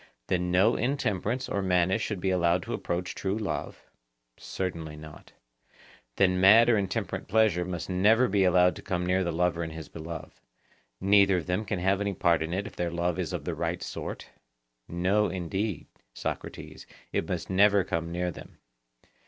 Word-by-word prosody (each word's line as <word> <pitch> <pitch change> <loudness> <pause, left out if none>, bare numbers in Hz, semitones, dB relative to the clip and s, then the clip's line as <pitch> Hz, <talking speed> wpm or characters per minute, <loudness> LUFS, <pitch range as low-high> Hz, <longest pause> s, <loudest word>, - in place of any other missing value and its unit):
Then 90 -1 0
no 95 +6 +4
intemperance 120 -1 -1
or 100 - -1
madness 95 +2 +2
should 105 -4 -3
be 95 +1 0
allowed 90 -1 +2
to - - -5
approach 90 +1 -3
true 95 +2 -2
love? 110 -3 -4 0.5
Certainly 85 -5 -5
not. 75 0 -12 0.8
Then 90 -1 +2
mad 110 +5 +7
or 120 - +5
intemperate 95 -2 -3
pleasure 105 -5 +2
must 90 -2 -5
never 105 +7 +4
be 100 -3 +2
allowed 90 0 +4
to - - -9
come 90 -1 -2
near 90 +1 +2
the 85 - -1
lover 85 0 0
and 80 -1 -4
his 80 -1 -8
beloved; 80 0 -8 0.7
neither 100 -1 +4
of 85 - -3
them 90 +4 -1
can 100 0 -2
have 95 +2 +1
any 100 -1 -1
part 85 -2 +2
in 80 +1 -3
it 95 +3 -2
if 110 - -9
their 85 -1 -1
love 85 +1 -1
is 85 -4 -2
of - - -4
the - - -2
right - - -3
sort? - - -6 0.6
No, 95 +5 +1
indeed, 95 +1 -3 0.3
Socrates, - - -6 0.3
it - - -1
must - - -3
never 100 +1 +5
come 85 -3 -3
near 90 +1 -1
them. - - -12
90 Hz, 175 wpm, -28 LUFS, 85-100 Hz, 0.8 s, mad